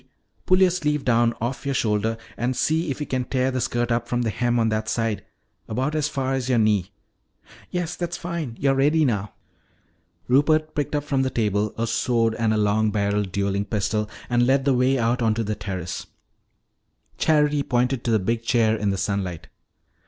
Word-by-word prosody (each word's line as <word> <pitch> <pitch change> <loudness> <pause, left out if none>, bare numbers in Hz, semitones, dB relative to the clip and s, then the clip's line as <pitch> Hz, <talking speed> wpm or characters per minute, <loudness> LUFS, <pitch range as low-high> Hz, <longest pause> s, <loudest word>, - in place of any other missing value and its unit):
Pull 185 +1 +4
your 185 -1 +6
sleeve 150 -5 -1
down 120 -1 +3
off 120 +3 -3
your 140 -1 -1
shoulder 110 0 0 0.2
and 125 +2 -1
see 160 +5 +1
if 135 - -3
you 150 - -2
can 130 -2 -1
tear 130 +1 0
the 130 -1 -2
skirt 120 -1 -1
up 120 0 0
from 120 0 0
the 115 - 0
hem 120 +4 0
on 115 -1 +2
that 110 0 -1
side 115 -3 -1 0.4
about 130 +7 -1
as 155 -2 +1
far 135 -2 -2
as 130 -1 -2
your 125 - +3
knee. 105 -4 +2 0.8
Yes, 175 -1 -3
that's 175 -1 -3
fine. 170 -9 -5
You're 135 -1 +3
ready 150 +4 +3
now." 105 -5 -1 0.9
Rupert 155 +4 +3
picked 145 0 -2
up 145 - 0
from 140 -2 0
the 130 - +1
table 105 -3 0
a 115 - 0
sword 115 0 +1
and 115 -1 0
a 110 - +1
long 105 +1 +2
barrelled 100 -1 0
dueling 100 +1 -1
pistol 105 0 -1 0.2
and 120 0 +2
led 135 +1 +2
the 140 - +4
way 130 +2 +2
out 120 +1 +1
onto 115 0 +1
the 105 0 -2
terrace. 95 -3 -5 1.1
Charity 150 -2 +3
pointed 125 -1 0
to - - -1
the 110 - +4
big 115 +4 -1
chair 115 -2 +2
in 105 -2 -1
the 95 - -1
sunlight. 95 -3 -3
120 Hz, 195 wpm, -23 LUFS, 110-135 Hz, 1.1 s, your